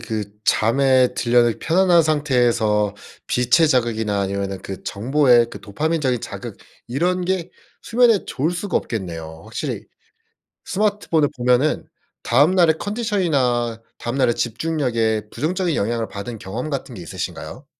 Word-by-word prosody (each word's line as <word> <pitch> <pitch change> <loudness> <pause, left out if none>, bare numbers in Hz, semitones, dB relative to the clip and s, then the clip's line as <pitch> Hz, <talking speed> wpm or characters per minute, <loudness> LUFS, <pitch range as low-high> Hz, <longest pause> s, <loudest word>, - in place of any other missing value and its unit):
그 110 -2 -3 0.2
잠에 130 +2 +3
들려는 120 -1 +2
편안한 175 0 +4
상태에서 120 -9 +1 0.3
빛의 150 +6 +3
자극이나 110 -6 +1
아니면은 100 0 -3
그 95 - -7
정보의 120 +1 +3
그 - - -9
도파민적인 135 +2 -1
자극 - - -7 0.3
이런 180 +8 0
게 185 -1 -1 0.3
수면에 235 -3 +3
좋을 150 +5 -1
수가 180 +3 -2
없겠네요. 80 -7 -5
확실히 - - -5 0.8
스마트폰을 200 -7 +1
보면은 125 +5 +2 0.4
다음 145 +9 +4
날의 165 -3 +4
컨디션이나 150 - 0 0.2
다음 120 +2 -4
날의 125 -4 +2
집중력에 115 -5 -1
부정적인 170 +5 -1
영향을 115 +2 -1
받은 105 +2 -7
경험 100 +10 -5
같은 135 -3 -4
게 90 - -8
있으신가요? 85 - -6
125 Hz, 325 characters per minute, -21 LUFS, 110-160 Hz, 0.8 s, 편안한